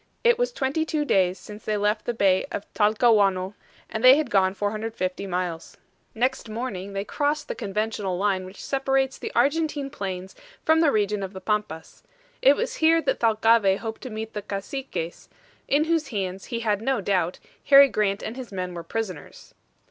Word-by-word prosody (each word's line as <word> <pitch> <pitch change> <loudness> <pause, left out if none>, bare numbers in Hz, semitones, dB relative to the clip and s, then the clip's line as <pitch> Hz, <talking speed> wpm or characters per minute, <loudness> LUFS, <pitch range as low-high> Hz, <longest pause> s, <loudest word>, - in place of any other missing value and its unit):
It 475 0 +4
was - - +1
twenty 285 - -1
two 310 -2 -1
days 185 -7 +2
since 210 +3 -11
they 215 -1 -1
left 210 +1 0
the 240 - -1
Bay 190 -3 +3
of 205 - -4
Talcahuano, 210 -3 +3 0.3
and 220 +1 -5
they 255 +1 +9
had 310 - -2
gone 190 -1 +3
450 205 -2 -3
miles. 175 -3 -4 0.4
Next 250 0 -1
morning 215 -4 -5
they 195 0 -2
crossed 295 +4 -1
the - - -3
conventional 210 -3 -2
line 195 -1 0
which 185 +2 -10
separates 270 -1 0
the - - -5
Argentine 295 -2 +1
plains 190 -4 -5 0.3
from 320 0 +4
the 320 -3 +4
region 210 -2 0
of 195 0 -5
the 190 - -7
Pampas. 190 -5 -3 0.4
It 275 +2 +6
was 485 +5 -3
here 325 +1 +4
that - - -1
Thalcave 220 -3 +4
hoped 225 0 -6
to 255 - -6
meet 220 0 -6
the 210 - -4
Caciques, 200 -3 -5 0.4
in 290 +2 +3
whose 320 -2 0
hands, 190 -3 -4
he 235 -1 -4
had 210 -3 0
no 265 +2 0
doubt, 185 -3 0 0.3
Harry 280 0 +8
Grant 205 -4 -1
and 220 - -5
his 255 -3 -8
men 180 -2 -4
were 170 - -5
prisoners. 185 -2 -6
215 Hz, 180 wpm, -25 LUFS, 195-265 Hz, 0.4 s, they